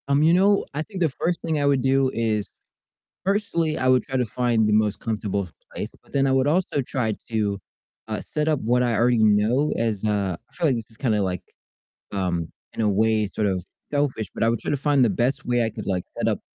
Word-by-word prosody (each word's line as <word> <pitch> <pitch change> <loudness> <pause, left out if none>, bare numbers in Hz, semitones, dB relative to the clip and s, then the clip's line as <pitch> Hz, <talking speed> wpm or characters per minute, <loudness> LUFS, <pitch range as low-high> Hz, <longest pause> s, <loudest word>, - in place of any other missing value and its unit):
Um, 140 +1 +3
you 165 +2 +5
know, 195 +3 +4
I 150 - -2
think 185 +3 -7
the 165 - +3
1st 170 +5 -2
thing 160 -2 -1
I - - +1
would 140 -2 +3
do 135 0 +2
is 110 -3 -1 0.8
firstly, 190 -6 0
I 130 - 0
would 130 -1 +4
try 135 -2 -3
to 125 - +1
find 115 -1 +1
the 105 - +2
most 105 -1 +2
comfortable 100 -3 -2 0.3
place, - - -5
but - - -24
then 135 -1 +3
I - - +2
would 135 +1 +3
also 155 -2 +1
try 120 -4 -1 0.2
to, 105 -3 0 0.5
uh, - - -3
set 150 0 -2
up 155 -3 +2
what 125 +3 +2
I 120 -2 +1
already 120 0 +3
know 110 +8 +3
as, 110 -3 -1
uh 100 -4 0
I - - -29
feel 165 - +1
like 135 - +2
this 115 -1 -6
is 110 - -10
kinda, 110 -5 +1
like, 90 -2 -2 0.7
um, 90 -4 -1 0.3
in - - -4
a 105 - +3
way, 110 +1 +2
sort 105 +2 -1
of 95 -3 -1 0.3
selfish, 145 -7 0
but - - 0
I - - +3
would 115 0 +1
try - - -3
to 145 - +1
find 140 -1 +3
the 115 - +3
best 130 +6 0
way 120 -1 +2
I 110 - -1
could, - - -8
like, 90 -2 -1
set - - +1
up - - 0
120 Hz, 240 wpm, -24 LUFS, 105-140 Hz, 0.8 s, you